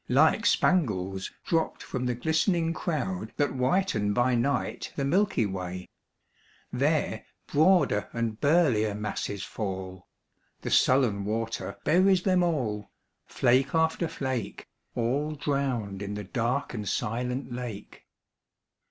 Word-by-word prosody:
Like 160 - +4
spangles 95 - +1
dropped 165 -1 0
from 125 -2 -3
the 125 - 0
glistening 165 - +1
crowd 110 - -3
That 145 -2 +1
whiten 130 - +1
by 125 +3 +2
night 125 +4 -1
the 140 - -1
milky 185 - +2
way; 90 -2 -5 0.8
There - - 0 0.2
broader 155 - +3
and 115 -2 -3
burlier 135 -10 +3
masses 105 -1 -3
fall; 95 -3 -5 0.5
The - - -4
sullen 125 -7 +3
water 115 +2 -3
buries 185 +2 +4
them 185 -2 +3
all 120 -12 -1 0.2
— - - -52
Flake 130 +4 +2
after 160 +1 +2
flake 130 -9 -4
— - - -46
All 140 +6 0
drowned 130 -9 -2
in 100 0 -4
the 105 - -4
dark 125 +8 -1
and 105 -4 -3
silent 125 +3 -2
lake. 120 -5 -7
125 Hz, 125 wpm, -28 LUFS, 105-155 Hz, 0.8 s, Like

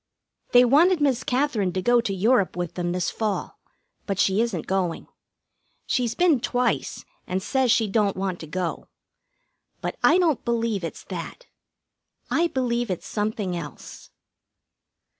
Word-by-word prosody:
They 245 0 +7
wanted 325 +8 +5
Miss 275 -4 +1
Katherine 250 -8 0
to 185 - -1
go 240 +2 +4
to 220 - -3
Europe 200 +2 +2
with 175 -2 -3
them 175 -1 -2
this 180 0 -1
fall, 215 -3 -3 0.5
but 195 -3 -1
she 195 +2 +3
isn't 220 -9 -2
going. 185 -3 -1 0.8
She's 245 -3 0
been 350 -7 +3
twice, 245 0 -1 0.2
and 185 +1 -1
says 260 +5 0
she 225 -1 +3
don't 200 -1 +1
want 190 -2 -2
to 160 - -8
go. 175 +2 -3 0.9
But - - -4
I - - +6
don't 330 -7 +2
believe 230 -4 -1
it's 165 - -6
that. - - -7 0.9
I 340 +1 +3
believe 240 -5 -1
it's 185 - -3
something 210 -3 -2
else. 150 -6 -9
220 Hz, 145 wpm, -24 LUFS, 185-250 Hz, 0.9 s, They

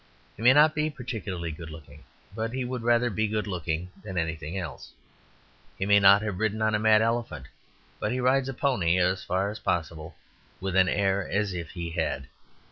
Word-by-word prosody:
He - - -12
may 125 +3 +7
not 150 +2 +6
be 155 0 0
particularly 100 - -5
good 80 +1 -9
looking, 75 -1 -12 0.3
but 110 +1 -3
he 130 -1 -2
would 125 -1 -4
rather 120 +1 +2
be 110 +2 0
good 105 0 -2
looking 90 -2 -3
than 95 -3 -7
anything 80 +1 -3
else; 85 -8 -7 0.8
he 95 - -2
may 100 0 +5
not 100 +1 +6
have 105 -4 -3
ridden 110 0 0
on 110 0 +1
a 105 - +2
mad 110 0 +5
elephant, 115 - -2 0.5
but 105 - -1
he 125 - -1
rides 130 +1 +2
a - - -3
pony 100 - +1
as 90 +1 +1
far 95 +2 -1
as 110 - -8
possible 80 -2 -3 0.4
with 95 -1 -3
an 95 -1 +5
air 100 -1 0
as 100 0 0
if 85 -2 -5
he 85 -1 -6
had. 80 -5 -2
100 Hz, 200 wpm, -27 LUFS, 85-115 Hz, 0.8 s, may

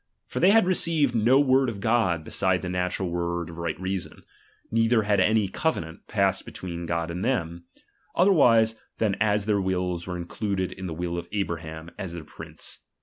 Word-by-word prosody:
^^| - - -18
T'or - - -1
they 180 - +6
had 220 -1 +6
received 165 -7 +2
no 120 +5 +4
icord 130 -1 +3
of 105 -4 -6
God 105 -7 +1
beside 95 +3 0
the - - -3
^^ - - -3
natural 90 0 -1
word 85 0 -2
of 85 - -10
right 85 -2 -3
reason; 95 0 -4 0.5
neither 115 0 +3
had 105 -1 +2
any 105 +1 +3
covenant 90 - -3
passed 100 -2 +1
between 85 -2 -6
God 85 0 -1
and 90 +3 -4
them, 85 -9 -1 0.5
otherwise 120 - +5 0.2
than 105 -3 +1
as 105 -1 +2
their 105 -2 +2
wills 90 -2 -2
were 90 -1 -3
included 95 +2 -3
in 95 -1 -6
the 80 - -5
will 85 0 -3
of 85 - -10
Abraham, 80 -5 -4
as 85 -3 -5
Xhevc 80 -2 -7
prince. - - -7
95 Hz, 190 wpm, -26 LUFS, 85-115 Hz, 0.5 s, they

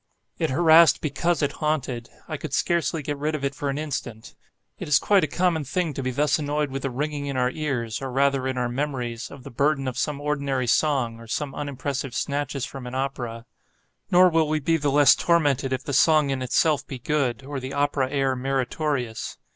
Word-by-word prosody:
It - - +1
harassed 160 +3 +6
because 160 +2 0
it 145 - +1
haunted. 130 -6 -1 0.2
I 155 - -4
could 150 -2 -4
scarcely 165 -2 0
get 145 0 -4
rid 155 +2 -1
of 145 - -5
it 140 - -1
for 140 +1 -3
an 135 - -2
instant. 135 -7 -5 0.5
It - - -5
is 150 - +5
quite 200 -2 +3
a - - +2
common 170 0 +1
thing 160 +4 -1
to 135 - -4
be 130 - -2
thus 145 +3 +1
annoyed 150 -1 -1
with 135 0 -4
the 135 - -2
ringing 145 +2 -3
in 140 -2 -3
our 125 0 +2
ears, 130 -8 -3
or 135 -1 -4
rather 135 0 +1
in 130 -1 -2
our 125 -1 0
memories, 120 -3 -3
of 140 -2 -12
the - - -9
burthen 140 +2 +1
of 130 - -3
some 150 -2 -1
ordinary 140 -3 -1
song, 120 -3 +1
or 115 - -12
some 140 +4 -3
unimpressive 140 -2 -4
snatches 140 -2 -2
from 135 -2 -8
an 125 - -6
opera. 120 -4 -3 0.6
Nor 180 +1 +6
will 160 -1 +3
we 155 0 +1
be 165 +3 +1
the 145 -2 0
less 145 0 +6
tormented 145 -6 +1
if 130 +1 -2
the 140 - -4
song 150 +1 +4
in 135 -1 -2
itself 140 +3 +1
be 135 - -6
good, 130 -2 -1
or 140 0 -4
the 130 +1 -6
opera 140 -2 +1
air 135 -2 0
meritorious. 130 -2 -2
140 Hz, 210 wpm, -24 LUFS, 130-150 Hz, 0.6 s, harassed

